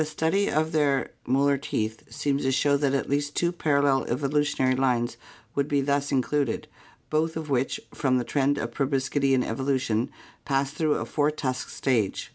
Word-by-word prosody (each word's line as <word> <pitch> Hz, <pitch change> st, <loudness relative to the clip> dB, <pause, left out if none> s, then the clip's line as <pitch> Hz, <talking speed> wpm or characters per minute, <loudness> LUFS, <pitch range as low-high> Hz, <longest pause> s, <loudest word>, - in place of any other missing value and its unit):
study 160 Hz, +6 st, 0 dB
of 155 Hz, +1 st, +1 dB
their 145 Hz, -4 st, +1 dB, 0.2 s
molar 140 Hz, +2 st, +3 dB
teeth 110 Hz, -5 st, -3 dB
seems 140 Hz, -1 st, -1 dB
to 130 Hz, -, +1 dB
show 140 Hz, +2 st, +3 dB
that 140 Hz, -1 st, +1 dB
at 135 Hz, -, -1 dB
least 145 Hz, +1 st, -1 dB
two 170 Hz, 0 st, +1 dB
parallel 140 Hz, -5 st, +2 dB
evolutionary 140 Hz, 0 st, +1 dB
lines 125 Hz, -2 st, +1 dB, 0.4 s
would 140 Hz, 0 st, 0 dB
be 145 Hz, -1 st, +1 dB
thus 140 Hz, +1 st, 0 dB
included, 135 Hz, -1 st, 0 dB, 0.4 s
both 160 Hz, +1 st, +1 dB
of 155 Hz, -2 st, -5 dB
which 130 Hz, 0 st, 0 dB
from 130 Hz, -3 st, +1 dB
the 125 Hz, -, 0 dB
trend 140 Hz, +3 st, +1 dB
of 120 Hz, -, -3 dB
proboscidean 135 Hz, -1 st, +1 dB
evolution 130 Hz, -2 st, 0 dB, 0.3 s
passed 135 Hz, 0 st, 0 dB
through 150 Hz, 0 st, +1 dB
a -, -, -2 dB
four 145 Hz, -1 st, +1 dB
tusked 135 Hz, -4 st, -3 dB
stage. 115 Hz, -7 st, 0 dB
140 Hz, 165 wpm, -26 LUFS, 130-145 Hz, 0.4 s, molar